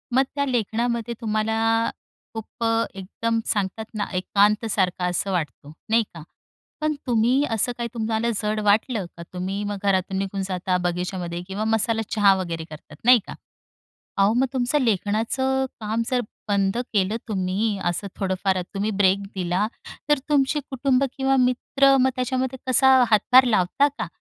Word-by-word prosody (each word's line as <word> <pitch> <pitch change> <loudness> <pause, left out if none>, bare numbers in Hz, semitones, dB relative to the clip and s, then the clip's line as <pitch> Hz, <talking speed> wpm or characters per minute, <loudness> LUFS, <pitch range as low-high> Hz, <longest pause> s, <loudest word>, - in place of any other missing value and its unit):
मग 265 - +5
त्या, 280 -1 0
लेखनामध्ये 235 -1 -1
तुम्हाला 225 +1 +1 0.4
खूप 225 +1 -7 0.3
एकदम 225 +4 -2
सांगतात 205 +2 -1
ना, 205 -1 -1
एकांत 205 +4 +2
सारखं 185 -3 0
असं 185 +2 -1
वाटतो, 155 -4 -4 0.2
नाही 225 +1 +4
का? 165 - -9 0.6
पण 305 0 +1
तुम्ही, 245 +4 +3
असं 225 +2 +1
काही 235 -1 -3
तुम्हाला 225 0 -1
जड 215 0 -1
वाटलं 210 0 +2
का, 170 - -7
तुम्ही 190 +3 -3
मग 205 0 -3
घरातून 190 -1 +1
निघून 195 0 -2
जाता, 185 0 -1
बगीच्यामध्ये 180 0 -3
किंवा 195 +2 -3
मसाला 225 0 +1
चहा 205 -2 +6
वगैरे 170 -3 -4
करतात, 155 -1 -12
नाही 250 -1 +7
का? - - -6 0.8
अहो, 200 +2 +4
मग 265 - +3
तुमचं 260 +3 +1
लेखनाचं 230 +5 0
काम 220 +1 -2
जर 250 -2 +1 0.3
बंद 200 +1 +1 0.2
केलं 200 +1 +1
तुम्ही 200 +1 -1
असं, 175 +3 -1
थोडंफार 190 -1 -1
तुम्ही 205 +2 -1
ब्रेक 190 0 +4 0.2
दिला 180 +2 0 0.4
तर, 295 -2 +4
तुमची 295 0 +2
कुटुंब 265 0 +1
किंवा 270 0 +2
मित्र 270 +2 +3
मग 260 - +4
त्याच्यामध्ये 260 0 -2
कसा 260 +1 +5 0.2
हातभार 250 +5 +6
लावता 225 +5 +2
का? - - -3
215 Hz, 150 wpm, -23 LUFS, 190-245 Hz, 0.8 s, नाही